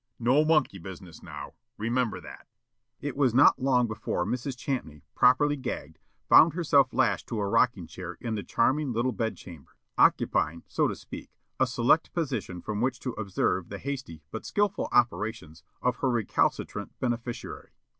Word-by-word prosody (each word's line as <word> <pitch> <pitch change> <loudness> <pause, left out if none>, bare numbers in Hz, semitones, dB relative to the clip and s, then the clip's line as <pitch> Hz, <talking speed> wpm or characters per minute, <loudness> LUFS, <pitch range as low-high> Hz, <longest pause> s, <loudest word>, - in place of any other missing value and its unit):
No 125 +6 +3
monkey 155 -11 +2
business, 90 -1 -10
now, - - -9 0.2
remember 115 +1 -1
that." - - -12 0.5
It 145 -3 -4
was 130 -4 +2
not 135 - +6
long 130 -2 +3
before 105 -5 -2
Mrs. 125 +4 -3
Champney, 80 - -4
properly 140 +4 +4
gagged, 80 - -6 0.3
found 160 - +7
herself 145 -6 +3
lashed - - +1
to 115 - -3
a 100 - 0
rocking 115 -3 +2
chair 90 +1 -8
in 115 -2 -3
the 105 - -2
charming 135 +6 +1
little 120 +3 +1
bed 115 -2 -2
chamber, 85 -6 -13 0.2
occupying, 85 +2 +3
so - - +1
to - - -3
speak, - - -10 0.3
a 130 - +4
select 125 +5 +2
position 125 - -3
from 105 0 -3
which 130 +2 0
to 125 - -3
observe 95 -4 -1
the 100 - -5
hasty 130 - -6
but 110 - -5
skillful 205 -1 0
operations 105 -9 0 0.2
of 125 -1 +1
her 135 - 0
recalcitrant 120 -4 -1
beneficiary. 120 -1 -4
120 Hz, 160 wpm, -28 LUFS, 100-130 Hz, 0.5 s, found